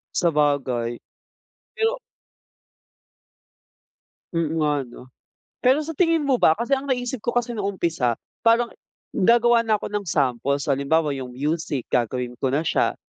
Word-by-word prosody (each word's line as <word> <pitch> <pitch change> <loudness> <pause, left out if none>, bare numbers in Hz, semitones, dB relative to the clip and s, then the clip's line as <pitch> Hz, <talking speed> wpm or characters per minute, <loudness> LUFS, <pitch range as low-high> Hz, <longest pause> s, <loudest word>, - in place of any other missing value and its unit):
Sabagay. 140 -7 +1 0.8
Pero 455 +1 0 2.4
Mm, 165 -2 0
nga 150 -1 +2
'no? 120 - -13 0.6
Pero 265 +4 +3
sa 310 - -6
tingin 330 -3 +3
mo 275 -3 +2
ba, 160 - +5
kasi 235 +7 -5
ang 275 - -8
naisip 250 -1 -1
ko 240 +2 -3
kasi 245 0 0
nung 200 -4 -2
umpisa, 160 -10 0 0.3
parang 235 +1 +4 0.4
gagawa 235 +2 +4
na 220 - +3
ako 210 - -3
ng 205 -1 -3
samples. 140 -1 0
Halimbawa 145 +3 +1
yung 130 -3 -5
music 150 -1 -2
gagawin 125 0 -1
ko 130 0 -1
na 150 - +1
siya, 165 - +1
165 Hz, 140 wpm, -23 LUFS, -, 2.4 s, ba